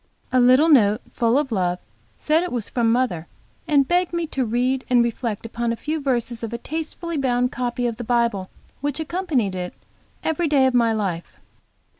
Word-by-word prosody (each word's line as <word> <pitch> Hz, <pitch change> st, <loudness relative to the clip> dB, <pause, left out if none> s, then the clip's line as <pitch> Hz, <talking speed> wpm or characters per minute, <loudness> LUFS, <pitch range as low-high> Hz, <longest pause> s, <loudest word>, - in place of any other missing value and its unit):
A 255 Hz, -, +3 dB
little 255 Hz, +5 st, +6 dB
note, 215 Hz, -9 st, +5 dB
full 235 Hz, +2 st, +2 dB
of 285 Hz, -3 st, 0 dB
love, 180 Hz, -4 st, 0 dB, 0.4 s
said 310 Hz, +2 st, +2 dB
it 360 Hz, -, -3 dB
was 235 Hz, -4 st, -3 dB
from 230 Hz, -2 st, +1 dB
mother, 230 Hz, -10 st, 0 dB, 0.4 s
and 280 Hz, -3 st, +3 dB
begged 355 Hz, 0 st, +1 dB
me 340 Hz, -1 st, 0 dB
to 265 Hz, -, +1 dB
read 250 Hz, +3 st, 0 dB
and 245 Hz, -1 st, +5 dB
reflect 235 Hz, -2 st, -3 dB
upon 235 Hz, +1 st, -2 dB
a -, -, -1 dB
few 310 Hz, +6 st, -3 dB
verses 240 Hz, -4 st, -1 dB
of 230 Hz, -1 st, -4 dB
a 235 Hz, -, -3 dB
tastefully 320 Hz, +4 st, -5 dB
bound 250 Hz, -2 st, +1 dB
copy 245 Hz, 0 st, -2 dB
of 235 Hz, -2 st, -2 dB
the 240 Hz, -, -5 dB
Bible, 235 Hz, -5 st, 0 dB, 0.3 s
which 290 Hz, +2 st, -3 dB
accompanied 315 Hz, -, -1 dB
it 180 Hz, -1 st, -5 dB, 0.5 s
every 320 Hz, +1 st, 0 dB
day 280 Hz, -3 st, +4 dB
of 260 Hz, -, +2 dB
my 235 Hz, -2 st, +3 dB
life. 195 Hz, -6 st, -3 dB
245 Hz, 190 wpm, -22 LUFS, 230-285 Hz, 0.5 s, little